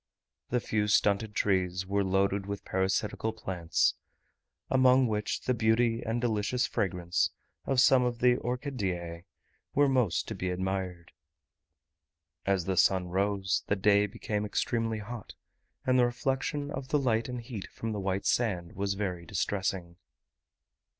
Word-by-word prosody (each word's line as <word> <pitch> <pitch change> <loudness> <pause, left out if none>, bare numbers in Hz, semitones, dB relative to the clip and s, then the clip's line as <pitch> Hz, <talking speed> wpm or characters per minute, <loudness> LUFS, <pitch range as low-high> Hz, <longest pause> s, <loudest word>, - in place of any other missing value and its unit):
The 125 - +1
few 105 -2 -1
stunted 105 +1 +2
trees 95 -2 +1
were 100 +1 +1
loaded 95 +1 +1
with 100 -1 -5
parasitical 95 +4 -1
plants, 90 -6 0 0.7
among 130 0 +5
which 105 -2 -1
the 125 - 0
beauty 115 0 +2
and 115 +1 -1
delicious 120 +1 0
fragrance 90 -7 0 0.4
of 135 -2 +2
some 130 0 +6
of 120 -1 -1
the 125 0 +4
orchideae 95 - -3 0.5
were 145 0 +5
most 120 - +1
to - - -3
be 90 - -3
admired. 90 -1 -3 1.4
As 95 -3 +2
the 95 -1 -1
sun 90 +2 +3
rose, 95 +1 0
the 100 - +2
day 100 +1 +4
became 105 +1 -3
extremely 115 +1 -1
hot, 110 +1 -8 0.5
and 130 0 +3
the 125 - +6
reflection 135 +4 -2
of 135 -2 -5
the 150 - +2
light 120 -4 +1
and 125 -1 -4
heat 115 -4 -7
from 115 - -5
the 105 - -3
white 95 0 -2
sand 90 -8 0
was 100 0 -1
very 90 -4 -3
distressing. 95 -3 -2
105 Hz, 145 wpm, -30 LUFS, 95-120 Hz, 1.4 s, some